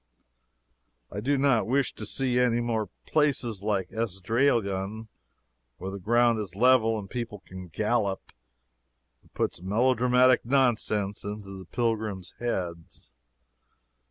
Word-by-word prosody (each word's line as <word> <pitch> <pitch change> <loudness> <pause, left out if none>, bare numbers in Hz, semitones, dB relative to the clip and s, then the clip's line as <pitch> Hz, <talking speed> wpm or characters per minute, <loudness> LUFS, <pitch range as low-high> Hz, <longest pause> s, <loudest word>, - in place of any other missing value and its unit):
I 100 - -4
do 140 +6 +1
not 135 -5 +2
wish 135 +1 +1
to 105 - -5
see 125 +1 +1
any 120 -1 +3
more 115 -4 -1 0.2
places 130 -9 +1
like 100 -3 -1
Esdraelon, 110 -1 0 0.7
where 95 +2 -5
the 100 - -6
ground 120 +3 +3
is 95 -4 -5
level 115 -1 +4
and 100 -2 -6
people 115 -2 -6
can 95 0 -9
gallop. 105 +2 -1 0.9
It - - -26
puts - - -2
melodramatic 125 +5 +3
nonsense 115 -6 +1
into 100 -1 -6
the 95 -1 -9
pilgrims' 110 -4 -2
heads. 90 -8 -4
110 Hz, 120 wpm, -27 LUFS, 100-120 Hz, 0.9 s, level